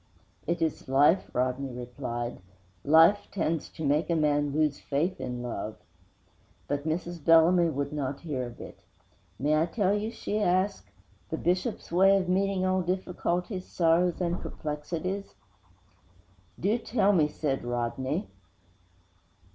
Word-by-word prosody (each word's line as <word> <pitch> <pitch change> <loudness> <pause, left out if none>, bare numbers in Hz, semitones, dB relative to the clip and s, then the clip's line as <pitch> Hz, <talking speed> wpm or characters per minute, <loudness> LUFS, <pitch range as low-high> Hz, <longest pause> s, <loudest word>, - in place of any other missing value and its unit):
'It 170 0 0
is 160 -4 -3
life,' 145 +7 +4
Rodney 130 +2 -1
replied. 120 -1 -5 0.4
'Life 165 +7 +5
tends 165 -5 -1
to 160 - -6
make 150 +4 +1
a 170 - +2
man 145 -2 +2
lose 150 -1 +1
faith 155 +4 -1
in 125 -1 -4
love.' 110 -3 -5 0.9
But 145 +1 -2
Mrs. 170 0 -3
Bellamy 165 +2 +5
would 140 -1 -3
not 140 -2 -3
hear 135 -7 -3
of 120 - -12
it. - - -10 0.6
'May 150 +5 +2
I 165 - +1
tell 195 +1 +1
you,' 210 +2 -2
she 215 -2 -3
asked, 185 - +1 0.4
'the - - -2
Bishop's 180 +6 -1
way 195 +3 +5
of 185 -2 -1
meeting 190 0 +1
all 185 0 +2
difficulties, 180 +1 -2
sorrows 170 +1 +2
and 175 -1 -1
perplexities?' 165 +6 -4 1.2
'Do 210 +6 +1
tell 215 -3 +2
me,' 155 -5 +4
said 145 -3 -2
Rodney. 120 - -2
165 Hz, 135 wpm, -28 LUFS, 140-185 Hz, 1.2 s, Life